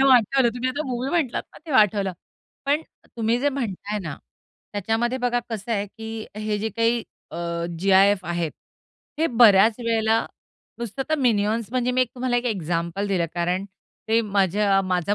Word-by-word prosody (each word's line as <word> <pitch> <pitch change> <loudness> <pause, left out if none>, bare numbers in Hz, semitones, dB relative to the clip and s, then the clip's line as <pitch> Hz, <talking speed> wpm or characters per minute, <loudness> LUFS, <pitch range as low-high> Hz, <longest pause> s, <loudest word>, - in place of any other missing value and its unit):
एकदम 270 0 +5
आठवलं 250 +1 +4
तुम्ही 250 +1 -1
आता 285 +4 -2
मूव्ही 255 +1 -2
म्हटलात 315 -9 0
ना, - - -13
ते - - -7
आठवलं. 200 -2 +2 0.5
पण 295 +3 +2 0.3
तुम्ही 230 +1 +1
जे 290 - +2
म्हणताय 210 -6 -3
ना, 160 -7 -6 0.6
त्याच्यामध्ये 225 +5 0
बघा 245 -1 +1
कसं 225 +1 -3
आहे, 205 -1 0
की 220 +1 -7
हे 215 -1 -2
जे 220 +2 -1
काही 230 0 +2 0.3
अ, - - -7 0.4
जी-आय-एफ 195 +1 +4
आहेत, 170 -2 -2 0.7
हे 325 - +3
बऱ्याच 220 -3 +6
वेळेला 225 -1 +2 0.6
नुसतं 235 +3 -4
तर 315 - +2
मिनिआन्स, 225 -3 +1
म्हणजे 250 -1 0
मी 255 0 +3
तुम्हाला 245 +1 -2
एक 240 - -1
एक्झाम्पल 175 -1 -2
दिलं 180 -4 +1
कारण, 180 +2 0 0.4
ते 225 +1 +4
माझ्या 200 -1 +2
माझा 185 +1 0
220 Hz, 160 wpm, -24 LUFS, 195-245 Hz, 0.7 s, बऱ्याच